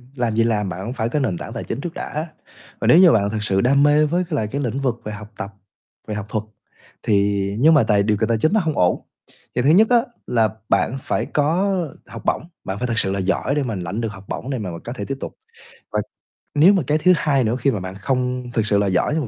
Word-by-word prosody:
làm 120 -4 -1
gì 115 - +3
làm, 105 -4 0
bạn 90 - -5
cũng 120 - -4
phải 115 -2 -2
có 150 - 0
nền 95 -11 -1
tảng - - -7
tài - - -5
chính 130 - -4
trước 170 - -5
đã. 155 +3 -4 0.5
Và - - -1
nếu 165 - +7
như 180 -3 +8
bạn 100 -5 +2
thực 105 0 -3
sự 95 -2 +1
đam 140 +4 +4
mê 150 +1 +5
với 175 +4 0
c - - -4
lại 110 -8 0
cái 140 +7 -3
lĩnh 125 0 -2
vực 120 -3 -1
về 105 - -5
học 105 +1 -9
tập, 100 +1 -5 0.6
về 105 - -3
học 105 -2 -4
thuật 110 -1 -2 0.6
thì 100 -1 +2
nhưng 160 +4 +6
mà 145 - +5
tài 105 -2 +3
điều 105 -1 +1
kiện 110 +1 0
tài 115 - +2
chính 155 - +1
nó 220 - +4
hông 160 -5 -1
ổn. 90 -1 +2 0.5
Thì 125 - +2
thứ 135 - +3
nhất 210 +7 +6
á 245 - +6 0.3
là 115 -3 +2 0.2
bạn 135 - +2
phải - - -1
có 175 +7 +1 0.3
học - - -9
bổng, - - +1 0.2
bạn 95 +1 -4
phải 125 - -1
thật 115 -1 -2
sự 95 - +1
là 100 - -1
giỏi 100 +9 0
để 145 - +1
mà 115 -5 -3
lãnh 95 +5 -4
được 115 -2 -2
học 100 0 -12
bổng 130 - -5
để 135 - -1
mà 100 -6 -4
mình 85 - -7
có 120 - -5
thể 130 - -5
tiếp 135 - -4
tục. - - -6 0.6
Và - - +1 0.6
nếu 170 +7 +7
mà 190 - +1
cái 150 +1 +3
thứ 180 +3 +5
hai 145 -4 +1
nữa 115 +2 0
khi 140 - +2
mà 105 - -2
bạn 95 +1 -6
không 125 +2 -2
thực 115 - +1
sự 105 -1 +2
là 100 - +2
giỏi 95 +10 +1
nhưng 150 -7 -1
120 Hz, 275 wpm, -21 LUFS, 105-145 Hz, 0.6 s, như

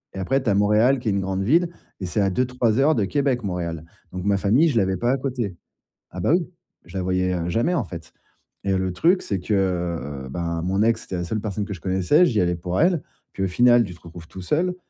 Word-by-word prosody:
et - - -4
après, 135 +8 0
tu 120 - -1
as 100 - +3
Montréal, 105 +6 +4
qui 115 - -2
est - - +2
une 100 - 0
grande 95 0 -2
ville 165 - +3 0.3
et 95 - -4
c'est 105 +4 0
à 95 -1 +2
2-3 125 0 +1
heures 150 +2 +4
de 105 -4 +1
Québec, 135 0 0
Montréal. 85 -4 -4 0.3
Donc, 90 0 -4
ma 100 -1 +2
famille, 115 - +3
je 125 - 0
l'avais 95 -2 +1
pas 120 +1 +1
à 135 - +1
côté. 120 -10 -3 0.5
Ah - - -8
bah, - - +1
oui. 175 -2 +1 0.4
Je - - -8
la 95 - -1
voyais, 90 0 0
heu, 85 0 -2
jamais, 120 - +1
en 125 - +1
fait 85 -3 -10 0.5
et 95 -1 +1
le 95 0 -1
truc, 180 - +2
c'est 100 -3 -2
que, 105 +4 -3 0.7
heu, 65 - -9
ben, 85 +1 -3
mon 95 +4 +1
ex, 115 0 +2
c'était 95 - -6
la 90 - -2
seule 110 +5 -3
personne 105 -1 -3
que 100 - -5
je 85 - -10
connaissais. 95 - +3
J'y 110 -4 +1
allais 90 -1 +1
pour 90 +2 -3
elle, 170 -1 +3 0.3
puis, - - -6
au - - +2
final, 120 +5 +5
tu 90 -4 -7
te - - -19
retrouves 85 -1 -11
tout 95 - -9
seul. 175 - 0
100 Hz, 260 wpm, -23 LUFS, 90-125 Hz, 0.7 s, final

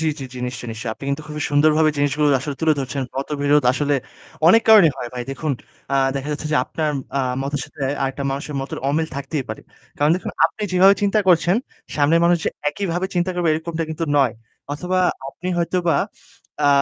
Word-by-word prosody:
জি, 160 - 0
জি, 135 - -4
জি - - -7
নিশ্চয়ই, 120 -1 -6
নিশ্চয়ই। 110 0 -4
আপনি - - -11
কিন্তু 140 +2 -2
খুবই 150 -1 -4
সুন্দরভাবে 155 +2 +4
জিনিসগুলো 145 +1 +2
আসলে 145 +2 -4
তুলে 160 -1 +4
ধরছেন। 135 0 -3
মতবিরোধ 145 +1 +1
আসলে 145 +2 0 0.5
অনেক 225 +6 +6
কারণেই 205 -9 +8
হয় 120 - -5
ভাই। 125 - -3
দেখুন, 145 +2 -2 0.4
আ - - +3 0.2
দেখা 135 +1 -3
যাচ্ছে 150 +1 -4
যে - - +3
আপনার 155 -1 -2 0.3
আ - - +2 0.2
মতের 140 +1 -2
সাথে 145 - -10 0.2
আরেকটা 135 +1 -2
মানুষের 140 +2 -4
মতের 135 0 -5
অমিল 160 +3 +1
থাকতেই 140 0 -3
পারে। - - -5 0.4
কারণ 145 +1 +3
দেখুন, 185 - -5
আপনি 165 +6 -1
যেভাবে 190 +2 +6
চিন্তা 205 +1 +2
করছেন, 175 +1 +4 0.4
সামনের 155 +3 +4
মানুষ 175 +1 +5
যে - - +2 0.2
একইভাবে 180 +2 -2
চিন্তা 175 +1 +1
করবে 175 -2 0
এরকমটা 160 +1 -2
কিন্তু 160 +1 -2
নয়। 135 -5 +4 0.4
অথবা 180 +5 -1 0.3
আপনি 180 +6 -7
হয়তোবা 170 -2 +1 0.7
আ - - +6
150 Hz, 190 wpm, -21 LUFS, 140-170 Hz, 0.7 s, কারণেই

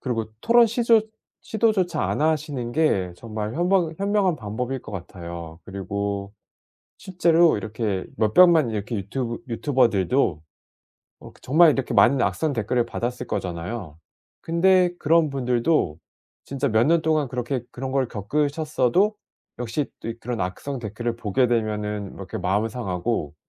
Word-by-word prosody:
그리고 115 -4 -2 0.2
토론 235 0 +5
시조 230 -1 +3 0.4
시도조차 200 -7 +1
안 - - -1
하시는 145 -6 -1
게 100 - +1
정말 110 0 -5
현명 175 -2 +1
현명한 200 -3 +2
방법일 125 +4 -4
것 - - -10
같아요. 85 -3 -8
그리고 100 +1 -4 0.7
실제로 175 -3 +3
이렇게 105 -2 -3
몇백만 155 +4 +5
이렇게 110 +2 -3
유튜브 115 +4 -3
유튜버들도 115 - +1 0.8
어 - - -12
정말 155 +3 +5
이렇게 135 -2 -2
많은 125 +6 +5
악성 155 +3 0
댓글을 115 +2 0
받았을 125 +1 -4
거잖아요. 90 -3 -5 0.4
근데 180 +1 +3
그런 160 +1 +3
분들도 125 - 0 0.5
진짜 140 0 -2
몇 110 +1 +3
년 165 0 +3
동안 155 -3 +1
그렇게 125 0 -3
그런 130 +1 -5
걸 135 -2 +1
겪으셨어도 150 - 0 0.4
역시 125 +4 -2
또 115 - -4
그런 120 -1 -4
악성 110 +10 -4
댓글을 115 +1 -4
보게 115 +3 +1
되면은 105 -3 -2
이렇게 - - -7
마음은 100 +4 0
상하고 95 -7 -3
125 Hz, 310 characters per minute, -24 LUFS, 105-155 Hz, 0.8 s, 토론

